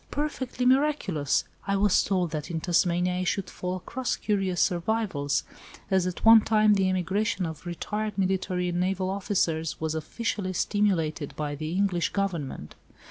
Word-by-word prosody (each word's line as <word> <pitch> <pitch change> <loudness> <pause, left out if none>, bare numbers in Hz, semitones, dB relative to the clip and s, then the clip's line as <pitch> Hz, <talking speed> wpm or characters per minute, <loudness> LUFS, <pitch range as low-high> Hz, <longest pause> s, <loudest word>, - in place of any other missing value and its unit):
Perfectly 265 -4 -2
miraculous! 255 - +2 0.2
I 200 - +1
was 200 -1 +4
told 180 -4 0
that 155 +1 -4
in 165 -2 -2
Tasmania 180 +1 +1
I 185 - -1
should 190 +1 -2
fall 180 0 -4
across 240 +7 -3
curious 195 -4 -1
survivals, 175 -6 0 0.5
as 190 -1 +3
at 180 - -4
one 225 0 +9
time 215 -1 +4
the 190 -2 +2
emigration 185 +2 0
of 160 +2 -7
retired 210 +4 -3
military 185 -1 0
and 175 0 -1
naval 185 +1 0
officers 170 -5 -1
was 160 -1 -2
officially 185 +4 -3
stimulated 170 -7 0
by 150 -1 -3
the 155 +3 -4
English 185 -3 +1
Government. 170 - -3
185 Hz, 150 wpm, -27 LUFS, 170-205 Hz, 0.5 s, one